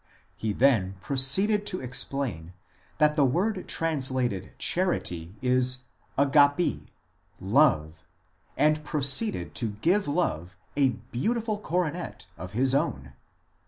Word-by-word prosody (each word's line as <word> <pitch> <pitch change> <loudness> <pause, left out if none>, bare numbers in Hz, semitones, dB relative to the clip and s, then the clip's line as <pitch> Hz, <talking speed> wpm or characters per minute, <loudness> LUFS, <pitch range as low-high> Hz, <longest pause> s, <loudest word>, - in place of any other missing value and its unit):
He 110 - -3
then 105 -6 +2
proceeded 140 - +3
to 185 - -1
explain 125 -9 -3 0.4
that 150 0 +3
the 150 - +3
word 185 - 0
translated 130 - -1
char 185 +1 +1
ity 85 +2 -5
is 125 0 +2 0.3
dyaTn;, 145 - +3 0.5
love, 95 - +2 0.5
and 155 0 +2
proceeded 150 - 0
to 110 -4 -3
give 195 +4 +2
Love 95 - -2 0.2
a 140 -2 +3 0.2
beautiful 220 - -1
coronet 175 -3 -3
of 90 +1 -9
his 130 +4 +2
own. 70 - -1
135 Hz, 110 wpm, -27 LUFS, 105-165 Hz, 0.5 s, proceeded